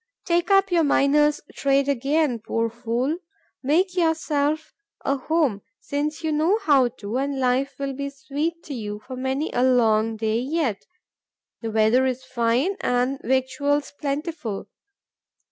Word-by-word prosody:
Take 345 +1 +1
up 390 -1 +4
your 340 -2 +4
miner's 295 +1 +3
trade 275 0 +2
again, 280 -1 +1
poor 230 +1 -1
fool! 240 +7 -2 0.4
Make 355 +7 +2
yourself 315 -3 0 0.3
a 275 - +2
home, 280 -6 0 0.2
since 300 +3 -3
you 315 - 0
know 320 +7 +2
how 275 -6 +5
to, 225 -1 -5
and 275 0 -2
life 260 +2 +1
will 275 -1 -3
be 280 +1 -4
sweet 305 +4 -4
to 290 - -7
you 210 -4 -5
for 255 - -7
many 265 +4 -2
a 245 - +1
long 225 -3 +3
day 220 +1 0
yet: 265 -5 -1 0.7
the 225 - -3
weather 220 +4 +3
is 260 0 -2
fine 255 +8 0
and 250 +2 0
victuals 285 +3 0
plentiful. 285 - -3
275 Hz, 145 wpm, -24 LUFS, 245-305 Hz, 0.7 s, how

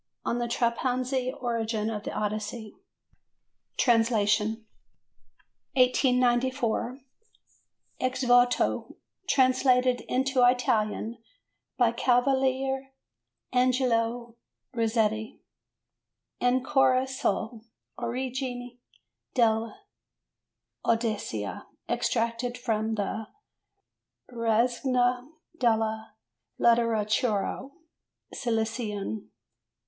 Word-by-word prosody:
"On 240 - 0
the 240 - -1
Trapanese 250 +2 0
Origin 225 -3 -1
of 210 -2 -4
the - - -5
Odyssey" 215 +1 -4 1.0
(Translation). 220 -2 +2 1.1
1894. 250 0 +2 1.0
Ex 255 +1 -1
Voto 245 0 +2 0.3
translated 255 -1 +3
into 260 0 +2
Italian 235 -2 +1 0.6
by 240 -2 +4
Cavaliere 265 +2 +1 0.6
Angelo 240 -2 +1 0.4
Rizzetti. 220 -2 0 1.0
"Ancora 255 +1 +3
sull' 230 -3 -2 0.4
origine 245 0 -4 0.6
dell' 225 -2 +2 1.1
Odissea." 215 - -2 0.2
Extracted 230 +2 -1
from 225 -2 -1
the 210 +1 -3 1.0
Rassegna 245 +2 +1 0.3
della 220 -2 0 0.4
Letteratura 230 0 +1 0.6
Siciliana. 220 -3 -2
240 Hz, 60 wpm, -27 LUFS, 225-255 Hz, 1.1 s, by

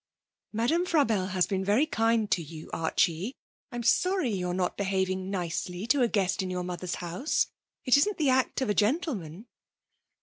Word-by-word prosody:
'Madame 240 +11 +1
Frabelle 225 - +2
has 185 -1 +2
been 190 -1 -2
very 210 +9 +3
kind 225 -6 +1
to 175 - +2
you, 160 0 -10
Archie. 170 +6 0 0.4
I'm 240 -1 -4
sorry 365 - +2
you're 180 -3 -2
not 180 -1 -1
behaving 190 -1 -1
nicely 180 0 -3
to 255 +3 +2
a 245 - +4
guest 195 -3 0
in 185 - -3
your 180 0 -2
mother's 180 0 -4
house. 180 - -1 0.3
It 255 +1 +6
isn't 410 +8 +2
the 290 -5 +2
act 260 +1 +1
of 260 - 0
a - - +2
gentleman.' 215 - -1
200 Hz, 170 wpm, -28 LUFS, 180-250 Hz, 0.4 s, It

